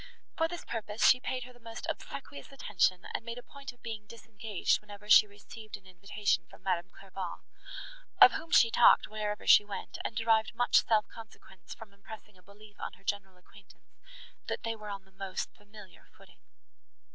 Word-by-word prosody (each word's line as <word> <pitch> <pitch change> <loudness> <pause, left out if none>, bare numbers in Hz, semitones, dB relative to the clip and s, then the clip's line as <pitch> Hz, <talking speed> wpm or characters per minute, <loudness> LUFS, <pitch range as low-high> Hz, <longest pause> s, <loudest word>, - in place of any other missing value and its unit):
For 325 - +2
this 350 +1 -7
purpose 220 -1 0
she 250 - +6
paid 255 0 -3
her 250 +1 -12
the 245 - -20
most 230 -1 -8
obsequious - - -7
attention, 190 -8 0
and - - -3
made 235 +1 -6
a 245 - -9
point 280 -1 -9
of 245 - -28
being 215 -2 -6
disengaged, 220 -3 -2
whenever 210 0 -12
she 210 - +9
received 210 +2 -11
an 190 - -24
invitation 200 +2 -1
from - - -17
Madame 180 -1 -1
Clairval, 190 -2 -8 0.8
of - - +10
whom 330 +1 -5
she 230 -9 +6
talked, - - +6
wherever 210 -1 -4
she - - +8
went, 205 -1 -7
and 225 - -4
derived 225 -1 +2
much 245 +1 +4
self 215 -2 +3
consequence 210 -4 -13
from 220 -3 -13
impressing 210 +1 -12
a 180 - -21
belief 205 +2 -17
on - - -5
her 185 +2 -18
general 195 -2 -3
acquaintance, 180 0 -21 0.5
that - - -3
they 230 0 -2
were 215 -1 -9
on 195 -1 -6
the 190 - -24
most 190 0 -5
familiar 205 -2 -15
footing. - - -19
210 Hz, 185 wpm, -31 LUFS, 195-225 Hz, 0.8 s, of